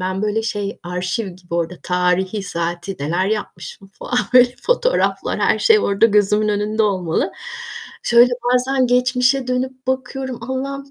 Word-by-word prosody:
Ben 185 +2 -2
böyle 215 +1 0
şey 205 -2 -3
arşiv 180 +4 -3
gibi 180 -1 -9
orada 170 +1 -1
tarihi, 180 +3 0
saati 175 +1 -4
neler 170 +6 0
yapmışım 205 -2 -5
falan 245 - -1 0.2
böyle 250 0 +6
fotoğraflar, - - 0
her - - +2
şey 445 -3 +5
orada 200 - +3
gözümün 210 0 +2
önünde 210 +1 0
olmalı. 185 -6 0 0.7
Şöyle 240 +1 +5 0.2
bazen 260 +1 +2
geçmişe 250 +1 +2
dönüp 255 0 -3
bakıyorum. 260 0 -3
Allah'ım 275 +1 -4
215 Hz, 140 wpm, -19 LUFS, 185-255 Hz, 0.7 s, böyle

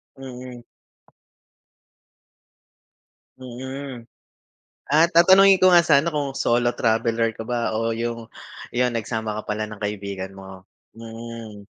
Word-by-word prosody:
Mm. 125 -2 -10 2.7
Mm, 130 +1 -8 0.9
ah, 155 +4 +5
tatanungin 190 +3 +6
ko 185 - +5
nga 175 -2 +6
sana 150 -1 +3
kung 145 -4 -2
solo 120 0 +2
traveler 115 -1 0
ka - - -6
ba 120 -1 -2
o 115 +1 -1
yung 115 0 -4 0.4
yun 125 -1 0
nagsama 110 -1 -3
ka - - -7
pala 105 +1 -2
ng 105 - -9
kaibigan 100 -2 -4
mo, 95 -1 -12 0.3
mm. 115 -2 -9
120 Hz, 110 wpm, -23 LUFS, 110-135 Hz, 2.7 s, tatanungin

